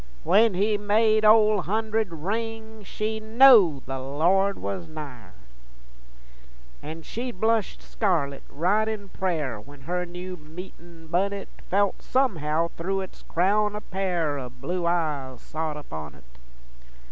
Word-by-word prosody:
when 215 Hz, -, +4 dB
he 205 Hz, +2 st, +1 dB
made 215 Hz, +1 st, +3 dB
Ole 215 Hz, -1 st, +6 dB
Hunderd 220 Hz, +2 st, 0 dB
ring, 220 Hz, +5 st, -4 dB
She 215 Hz, +3 st, -3 dB
knowed 220 Hz, -, +6 dB
the 135 Hz, 0 st, -4 dB
Lord 175 Hz, +9 st, +2 dB
was 180 Hz, -4 st, -4 dB
nigher. 145 Hz, -, -9 dB, 1.5 s
An' 160 Hz, +2 st, -8 dB
she'd 240 Hz, 0 st, -6 dB
blush 220 Hz, -1 st, +1 dB
scarlit, 155 Hz, -10 st, -1 dB
right 195 Hz, +8 st, +1 dB
in 210 Hz, -3 st, -4 dB
prayer, 155 Hz, -, -2 dB
When 140 Hz, +4 st, -15 dB
her 180 Hz, +5 st, -2 dB
new 180 Hz, +1 st, -7 dB
meetin' 165 Hz, +1 st, -11 dB
bunnet 195 Hz, +4 st, -1 dB, 0.2 s
Felt 200 Hz, 0 st, +1 dB
somehow 170 Hz, -, +1 dB
thru' 195 Hz, +4 st, -2 dB
its 190 Hz, -, -9 dB
crown 205 Hz, +4 st, +1 dB
a 210 Hz, -, -4 dB
pair 175 Hz, -8 st, -1 dB
O' 125 Hz, -2 st, -6 dB
blue 170 Hz, +8 st, -3 dB
eyes 150 Hz, -7 st, -1 dB
sot 155 Hz, +2 st, -4 dB
upon 80 Hz, -, -8 dB
it. 65 Hz, -, -18 dB
180 Hz, 130 wpm, -26 LUFS, 155-215 Hz, 1.5 s, Ole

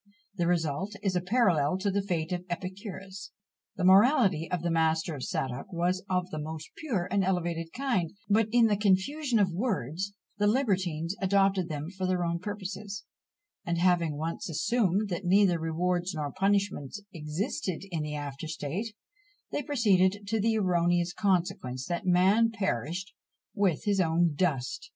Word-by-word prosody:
The 175 Hz, -3 st, 0 dB
result 175 Hz, +4 st, 0 dB
is 190 Hz, -3 st, 0 dB
a 180 Hz, -, +2 dB
parallel 180 Hz, -, +2 dB
to 200 Hz, +1 st, 0 dB
the 200 Hz, +1 st, +1 dB
fate 175 Hz, -3 st, -2 dB
of 180 Hz, -1 st, -2 dB
Epicurus. 190 Hz, +2 st, -6 dB, 0.5 s
The -, -, -3 dB
morality 195 Hz, -, +5 dB
of 180 Hz, -2 st, -2 dB
the 170 Hz, -, 0 dB
master 160 Hz, 0 st, +1 dB
of 140 Hz, -, -6 dB
Sadoc 130 Hz, +7 st, -3 dB
was 180 Hz, +2 st, 0 dB
of 180 Hz, -1 st, 0 dB
the 155 Hz, -, -4 dB
most 155 Hz, +1 st, -6 dB
pure 235 Hz, -, -2 dB
and 200 Hz, 0 st, +2 dB
elevated 170 Hz, -3 st, -1 dB
kind, 235 Hz, -12 st, -1 dB, 0.2 s
but 210 Hz, +1 st, +3 dB
in 240 Hz, 0 st, +5 dB
the 215 Hz, -2 st, +3 dB
"confusion 225 Hz, +7 st, +2 dB
of 195 Hz, -3 st, +3 dB
words," 190 Hz, -, -2 dB, 0.3 s
the 205 Hz, -, +3 dB
libertines 190 Hz, -, 0 dB
adopted 195 Hz, -2 st, +2 dB
them 155 Hz, +2 st, -4 dB
for 190 Hz, -1 st, -3 dB
their 180 Hz, -1 st, +1 dB
own 170 Hz, 0 st, -1 dB
purposes 205 Hz, +1 st, -6 dB, 0.6 s
and 170 Hz, -1 st, -1 dB
having 170 Hz, -4 st, +2 dB
once 165 Hz, +3 st, -4 dB
assumed 200 Hz, +5 st, +1 dB
that 175 Hz, +1 st, -3 dB
neither 185 Hz, -1 st, +4 dB
rewards 175 Hz, +2 st, -1 dB
nor 150 Hz, -2 st, -3 dB
punishments 195 Hz, -3 st, 0 dB
existed 160 Hz, +2 st, -3 dB
in 165 Hz, -3 st, -1 dB
the 150 Hz, 0 st, -3 dB
after 145 Hz, +1 st, -5 dB
state, 165 Hz, +8 st, -4 dB, 0.6 s
they -, -, -1 dB
proceeded 205 Hz, -7 st, +2 dB
to 220 Hz, 0 st, +1 dB
the 225 Hz, +1 st, +2 dB
erroneous 175 Hz, -2 st, +2 dB
consequence 170 Hz, -11 st, 0 dB
that 175 Hz, +1 st, -3 dB
man 190 Hz, +6 st, +4 dB
perished 185 Hz, -, -3 dB, 0.4 s
with 190 Hz, -6 st, +1 dB
his 205 Hz, -3 st, +1 dB
own 170 Hz, -1 st, +2 dB
dust! 145 Hz, -6 st, -1 dB
180 Hz, 160 wpm, -29 LUFS, 165-200 Hz, 0.6 s, morality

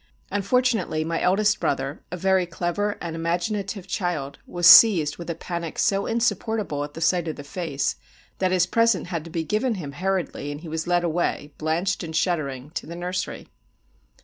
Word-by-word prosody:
Unfortunately 205 Hz, -5 st, +1 dB
my 165 Hz, +1 st, -2 dB
eldest 205 Hz, +3 st, +3 dB
brother, 135 Hz, +1 st, -2 dB
a 180 Hz, -, -4 dB
very 190 Hz, 0 st, +2 dB
clever 175 Hz, +4 st, -2 dB
and 170 Hz, -2 st, -5 dB
imaginative 180 Hz, +4 st, -2 dB
child, 175 Hz, -8 st, -3 dB
was 175 Hz, -1 st, -2 dB
seized 170 Hz, -6 st, +8 dB
with 170 Hz, 0 st, -8 dB
a 170 Hz, -, -2 dB
panic 170 Hz, -2 st, -5 dB
so 195 Hz, 0 st, +1 dB
insupportable 220 Hz, -8 st, -1 dB
at 145 Hz, 0 st, -8 dB
the -, -, -6 dB
sight 170 Hz, 0 st, +2 dB
of 160 Hz, -, -3 dB
the 145 Hz, -, -9 dB
face, 140 Hz, -2 st, -2 dB, 0.4 s
that 185 Hz, -, +2 dB
his 180 Hz, -2 st, +3 dB
present 230 Hz, -6 st, +2 dB
had 165 Hz, -4 st, -3 dB
to -, -, -8 dB
be 165 Hz, 0 st, -2 dB
given 215 Hz, +7 st, 0 dB
him 155 Hz, -7 st, -6 dB
hurriedly, 180 Hz, -2 st, -2 dB
and 145 Hz, +1 st, -7 dB
he 170 Hz, -, -9 dB
was 160 Hz, +1 st, -3 dB
led 175 Hz, 0 st, +2 dB
away, 160 Hz, -3 st, -1 dB
blanched 170 Hz, +5 st, 0 dB
and 160 Hz, -1 st, -6 dB
shuddering, 150 Hz, -6 st, -1 dB
to 165 Hz, -, -5 dB
the 170 Hz, -, -7 dB
nursery. 180 Hz, +1 st, -4 dB
175 Hz, 180 wpm, -24 LUFS, 160-195 Hz, 0.4 s, seized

